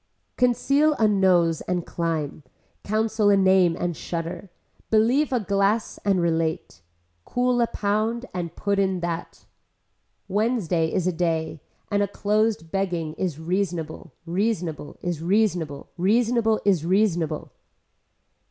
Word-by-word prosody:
Conceal 275 Hz, +5 st, +3 dB
a 225 Hz, -6 st, +2 dB
nose 180 Hz, -5 st, +3 dB
and 180 Hz, -2 st, -1 dB
climb, 160 Hz, -4 st, -3 dB, 0.4 s
counsel 215 Hz, 0 st, +1 dB
a 200 Hz, -, +5 dB
name 190 Hz, -3 st, +4 dB
and 175 Hz, -1 st, -1 dB
shudder, 170 Hz, +4 st, -5 dB, 0.4 s
believe 240 Hz, +7 st, +3 dB
a 250 Hz, -, +2 dB
glass 200 Hz, +2 st, 0 dB
and 195 Hz, -2 st, +2 dB
relate, 160 Hz, -, -1 dB, 0.4 s
cool 245 Hz, -, +1 dB
a 235 Hz, -, +3 dB
pound 220 Hz, +3 st, -1 dB
and 175 Hz, -2 st, -4 dB
put 200 Hz, -1 st, 0 dB
in 190 Hz, -2 st, +1 dB
that. 170 Hz, 0 st, -5 dB, 0.8 s
Wednesday 195 Hz, -6 st, 0 dB
is 185 Hz, -3 st, 0 dB
a 185 Hz, -, +1 dB
day 160 Hz, -2 st, -1 dB, 0.3 s
and 205 Hz, 0 st, +2 dB
a 200 Hz, -, +2 dB
closed 205 Hz, -3 st, 0 dB
begging 175 Hz, -5 st, -1 dB
is 175 Hz, -5 st, -3 dB
reasonable, 170 Hz, -2 st, -3 dB
reasonable, 175 Hz, -4 st, -2 dB
is 175 Hz, -3 st, -2 dB
reasonable, 175 Hz, -6 st, 0 dB
reasonable 225 Hz, +3 st, +2 dB
is 190 Hz, -6 st, +3 dB
reasonable. 175 Hz, -4 st, 0 dB
190 Hz, 125 wpm, -24 LUFS, 165-215 Hz, 0.8 s, a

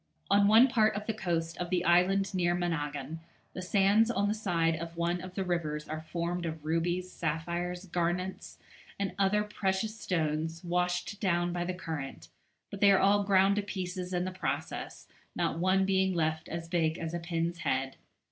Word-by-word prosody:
On 200 Hz, 0 st, +5 dB
one 225 Hz, +5 st, +7 dB
part 220 Hz, -5 st, +3 dB
of 210 Hz, +1 st, -4 dB
the 220 Hz, -, -1 dB
coast 170 Hz, -5 st, -2 dB
of 175 Hz, -1 st, -3 dB
the 180 Hz, -1 st, 0 dB
island 185 Hz, +3 st, +3 dB
near 175 Hz, -1 st, +2 dB
Managgan 155 Hz, -3 st, -3 dB, 0.3 s
the 185 Hz, -, -5 dB
sands 200 Hz, +4 st, +3 dB
on 205 Hz, -4 st, +1 dB
the 205 Hz, -, +1 dB
side 170 Hz, -6 st, +1 dB
of 170 Hz, +1 st, -7 dB
one 170 Hz, +1 st, 0 dB
of 185 Hz, 0 st, -9 dB
the 195 Hz, -, -1 dB
rivers 155 Hz, -4 st, -2 dB
are 155 Hz, 0 st, -4 dB
formed 170 Hz, +2 st, -3 dB
of 160 Hz, -1 st, -6 dB
rubies, 175 Hz, +3 st, -1 dB
sapphires, 175 Hz, +3 st, -3 dB
garnets, 180 Hz, +1 st, -2 dB, 0.4 s
and 200 Hz, -1 st, -2 dB
other 200 Hz, +2 st, +3 dB
precious 210 Hz, +1 st, -2 dB
stones 160 Hz, -1 st, -1 dB
washed 180 Hz, +3 st, -1 dB
down 175 Hz, -2 st, +1 dB
by 175 Hz, -1 st, -1 dB
the 185 Hz, 0 st, -3 dB
current, 160 Hz, -6 st, -6 dB, 0.4 s
but 200 Hz, -, -7 dB
they 200 Hz, -1 st, +7 dB
are 195 Hz, -, +6 dB
all 205 Hz, +2 st, +4 dB
ground 195 Hz, 0 st, +4 dB
to -, -, +2 dB
pieces 185 Hz, -2 st, -4 dB
in 180 Hz, 0 st, 0 dB
the 185 Hz, -, -3 dB
process, 185 Hz, 0 st, -4 dB, 0.3 s
not 165 Hz, -, -1 dB
one 190 Hz, +2 st, +3 dB
being 190 Hz, -1 st, +2 dB
left 160 Hz, -1 st, -1 dB
as 165 Hz, 0 st, -5 dB
big 165 Hz, -1 st, +1 dB
as 165 Hz, -1 st, -4 dB
a 170 Hz, -, -1 dB
pin's 170 Hz, 0 st, -2 dB
head. 135 Hz, -2 st, -1 dB
180 Hz, 185 wpm, -30 LUFS, 165-195 Hz, 0.4 s, one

